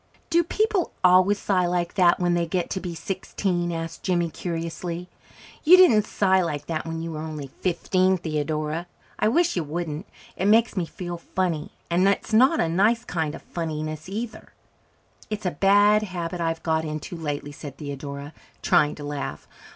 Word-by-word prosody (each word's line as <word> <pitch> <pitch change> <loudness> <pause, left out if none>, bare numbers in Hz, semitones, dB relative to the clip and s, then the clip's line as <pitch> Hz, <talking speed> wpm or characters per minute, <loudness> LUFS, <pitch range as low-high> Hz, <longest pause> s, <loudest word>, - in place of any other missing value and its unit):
"Do 340 +1 +5
people 415 +1 0
always 185 +3 +5
sigh 185 -3 +1
like 175 -1 -1
that 180 -3 +4
when 175 -1 +2
they 170 -1 +1
get 175 +1 -2
to 190 - -1
be 180 -2 -5
sixteen?" 175 0 -2
asked 165 0 -5
Jimmy 175 -3 0
curiously. 170 +1 -4 0.5
"You 355 +4 +8
didn't 230 - +6
sigh 190 -2 +3
like 145 -4 -3
that 160 -1 -3
when 165 0 -4
you 165 - -4
were 155 - -5
only 155 -4 -6
fifteen, 185 +1 +2
Theodora. 155 +1 -2 0.3
I - - +3
wish 335 +9 +2
you 175 - 0
wouldn't. 160 +3 -4 0.3
It 190 - 0
makes 225 +1 +4
me 180 -4 -1
feel 175 0 -6
funny 170 -3 -2 0.2
and 180 +3 +4
it's 200 +2 0
not 260 +8 +5
a - - +2
nice 210 +8 +2
kind 160 -6 -2
of - - -11
funniness 155 -1 -4
either." 220 +3 -6 0.8
"It's 215 -1 -4
a 180 - +1
bad 205 +5 +5
habit 180 -3 -4
I've 165 -1 -1
got 160 -1 +1
into 155 +2 -5
lately," 145 -3 -4
said 140 -1 -9
Theodora, 140 0 -6 0.3
trying 150 0 +3
to 150 - -9
laugh. 145 -1 -5
175 Hz, 175 wpm, -25 LUFS, 160-195 Hz, 0.8 s, You